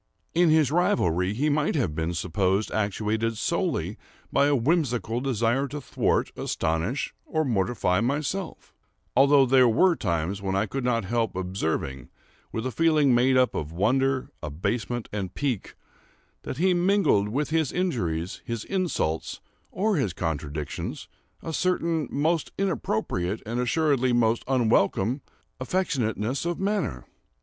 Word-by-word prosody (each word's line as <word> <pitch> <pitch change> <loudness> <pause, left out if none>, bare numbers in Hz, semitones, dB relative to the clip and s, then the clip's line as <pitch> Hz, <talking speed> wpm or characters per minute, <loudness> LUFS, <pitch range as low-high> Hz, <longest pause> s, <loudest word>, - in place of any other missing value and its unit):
In 175 0 +4
his 155 -3 +4
rivalry 95 - +2
he 145 +6 +1
might 150 +1 +1
have 110 - 0
been 80 +2 -2
supposed 95 +4 0
actuated 110 +2 -1
solely - - -1 0.3
by 140 - +4
a 145 - +3
whimsical 125 -4 0
desire 130 +1 +1
to 145 +3 -5
thwart, 135 - 0
astonish, 80 - -2
or 155 -1 -1
mortify 105 -4 +1
myself; 150 +9 -3 0.4
although 140 +1 +6
there 130 0 +5
were 175 +10 +4
times 85 - -2
when 95 -1 -1
I 100 +3 +2
could 135 +5 -4
not 115 -4 +1
help 115 +1 -1
observing, 80 -8 -3 0.4
with 115 +2 -3
a 130 - -1
feeling 155 -3 +3
made 130 +2 +4
up 125 -1 +3
of 75 0 -4
wonder, 130 +9 +1
abasement, 110 +10 -3
and 95 -4 -4
pique, 130 -8 -2 0.7
that - - -6
he 185 +3 +3
mingled 175 - +3
with 145 +7 -2
his 160 -4 +1
injuries, 90 - -2
his 115 -2 -4
insults, 175 - -2 0.3
or 205 0 0
his 105 - 0
contradictions, 75 -3 -4 0.4
a 160 - -4
certain 170 -3 0
most 155 +3 0
inappropriate, 110 - -1
and 115 +3 -3
assuredly 130 -1 +2
most 115 -1 +2
unwelcome 120 -1 +2 0.4
affectionateness 130 - -1
of 170 0 -2
manner. 190 - -1
120 Hz, 135 wpm, -26 LUFS, 100-150 Hz, 0.7 s, although